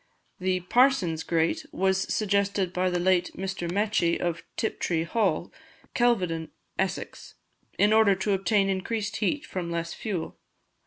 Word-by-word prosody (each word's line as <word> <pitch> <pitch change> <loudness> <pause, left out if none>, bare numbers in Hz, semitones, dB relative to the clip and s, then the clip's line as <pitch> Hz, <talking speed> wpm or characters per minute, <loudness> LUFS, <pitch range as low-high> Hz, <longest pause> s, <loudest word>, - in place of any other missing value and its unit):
The 185 0 0
"Parson's" 185 - +3
grate 165 0 0
was 190 0 0
suggested 200 -3 +1
by 185 0 +1
the 180 - 0
late 180 0 +2
Mr. 185 -2 -3
Mechi, 200 -4 +1
of 170 -1 -2 0.2
Tiptree 170 -6 -1
Hall, 220 +6 0 0.4
Kelvedon, 180 -10 +1 0.3
Essex, 190 0 -3 0.4
in 205 +1 +4
order 220 -3 +5
to 190 +2 -1
obtain 195 +1 +2
increased 200 +2 -2
heat 290 +7 -1
from 180 -8 -4
less 170 0 -3
fuel. 190 -7 -4
190 Hz, 135 wpm, -27 LUFS, 175-205 Hz, 0.4 s, order